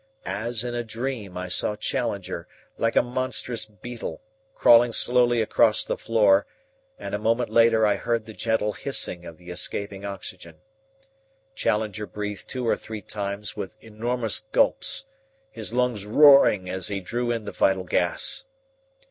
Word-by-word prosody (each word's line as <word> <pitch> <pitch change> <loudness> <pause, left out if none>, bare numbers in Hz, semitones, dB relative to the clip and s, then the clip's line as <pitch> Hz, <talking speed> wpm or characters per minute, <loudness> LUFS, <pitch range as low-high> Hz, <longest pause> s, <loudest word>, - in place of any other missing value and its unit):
As 110 +4 -2
in 120 -1 -4
a 120 0 -2
dream 115 -4 -5
I 90 0 -4
saw 90 +3 +1
Challenger, 100 -7 -3 0.3
like 115 0 0
a - - +5
monstrous 125 -2 -1
beetle, 110 -3 -8 0.3
crawling 120 0 +6
slowly 120 -1 +3
across - - +3
the - - -1
floor, 105 -3 +3 0.5
and - - -7
a 105 - -1
moment 115 +3 0
later 115 -1 +5
I 105 -1 +2
heard 115 -2 -1
the 110 - -10
gentle 110 -1 0
hissing 90 -10 -2
of 80 - -10
the 90 0 -11
escaping 100 +2 -3
oxygen. 100 -1 -7 1.0
Challenger 105 - -1
breathed 105 -1 -6
two 125 -2 -3
or - - +3
three 110 -2 -8
times 100 +1 -4
with 95 - -6
enormous 115 +2 -1
gulps, - - +1 0.5
his - - -5
lungs 120 -5 0
roaring 135 -7 +6
as 95 0 -2
he 100 -1 -2
drew 120 +6 -3
in 115 -2 -2
the - - -5
vital 95 -1 +2
gas. 90 - 0
110 Hz, 150 wpm, -25 LUFS, 100-120 Hz, 1.0 s, crawling